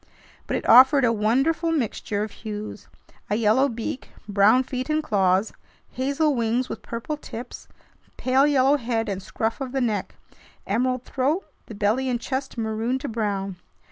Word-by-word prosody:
But - - 0
it - - -5
offered 260 +3 +7
a 230 - +3
wonderful 270 +10 +1
mixture 220 -7 -1
of 215 - -5
hues: 215 -1 -7 0.4
a 205 - +1
yellow 230 +5 +3
beak, 235 +2 -5 0.2
brown 205 +5 +4
feet 255 +2 -4
and 310 0 +1
claws, 195 -3 +2 0.4
hazel 280 +4 +1
wings 240 +1 0
with - - -6
purple 235 +7 -5
tips, 245 -4 -9 0.5
pale 265 +2 +3
yellow 280 0 +4
head 230 -3 -2
and 195 -2 -3
scruff 225 +6 -3
of 260 -1 -4
the 270 - 0
neck, 215 -5 -1 0.5
emerald 255 +4 0
throat, 285 +10 -1 0.2
the 220 - -9
belly 220 +6 +1
and 245 -1 0
chest 265 +1 -4
maroon 225 +3 -1
to 275 - -5
brown. 200 -5 -2
240 Hz, 160 wpm, -24 LUFS, 215-265 Hz, 0.5 s, offered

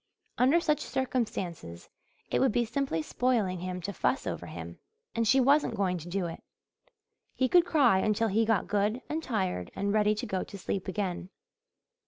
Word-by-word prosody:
Under 265 +7 +5
such 300 -3 +1
circumstances 210 - -3 0.4
it - - +2
would 265 - +3
be 240 +2 +1
simply 230 - -1
spoiling 215 -5 0
him 180 +1 -4
to 200 +3 -4
fuss 265 - 0
over - - -4
him, - - -8 0.3
and 230 -1 0
she 270 - +5
wasn't 275 -1 +3
going 185 -3 0
to 170 +2 -9
do 190 0 -1
it. 165 - -6 0.9
He 260 - +2
could 350 +4 +5
cry 250 -11 +4
until 215 +2 +1
he 220 +3 +2
got 225 -4 +1
good 210 +5 0
and 315 +2 -2
tired 190 - -2
and 200 +1 -1
ready 210 0 +3
to 245 - -4
go 190 -5 -2
to 200 - -10
sleep 190 0 -3
again. 185 -2 -3
210 Hz, 180 wpm, -29 LUFS, 185-255 Hz, 0.9 s, Under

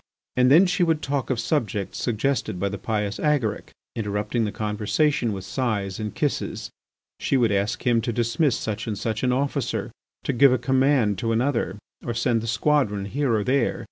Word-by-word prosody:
And 125 0 +4
then 165 +8 +7
she 180 0 0
would 165 -3 +2
talk 140 -2 -2
of 130 -3 0
subjects 105 - -1
suggested 120 -4 -1
by 100 +2 0
the 100 -1 -6
pious 105 -1 -2
Agaric, 145 -8 0 0.3
interrupting 105 +2 -1
the 105 - -2
conversation 110 +6 0
with 95 -2 -5
sighs 100 -4 -2
and 105 -2 -4
kisses. - - -2 0.5
She 135 - +1
would 120 -4 +3
ask 100 +1 -1
him 120 -2 +3
to 120 - -2
dismiss 120 +4 +1
such 110 +1 -4
and 105 -2 -2
such 110 +1 -2
an 125 - +2
officer, 135 +3 -1 0.3
to 140 - -1
give 135 +2 +6
a - - +3
command 130 -7 +2
to 115 +1 -1
another, 120 -1 0 0.2
to 120 - -4
send 115 -1 +1
the 115 - -5
squadron 115 -5 +1
here 135 +5 -1
or 105 - 0
there. 130 +2 +1
115 Hz, 185 wpm, -24 LUFS, 105-135 Hz, 0.5 s, then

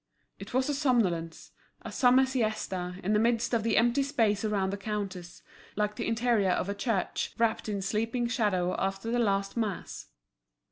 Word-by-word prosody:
It - - -9
was 260 +1 +1
a 295 - 0
somnolence, 210 - 0 0.3
a - - -6
summer 255 +1 +5
siesta, 215 -8 -2
in 200 +4 +1
the 210 - +4
midst 230 +1 +1
of 230 - +3
the 225 0 +1
empty 240 +4 +3
space 225 -8 +1
around 200 -3 0
the 200 - -3
counters, 195 -4 -5 0.3
like 210 0 -1
the 230 - -3
interior 230 -4 +2
of 180 - 0
a 200 - -1
church 200 -1 -2
wrapt 225 -1 0
in 200 -2 -2
sleeping 225 +5 -1
shadow 205 -7 0
after 195 +4 -2
the 240 - +1
last 195 -3 0
mass. 215 -6 -4
215 Hz, 175 wpm, -29 LUFS, 195-235 Hz, 0.3 s, summer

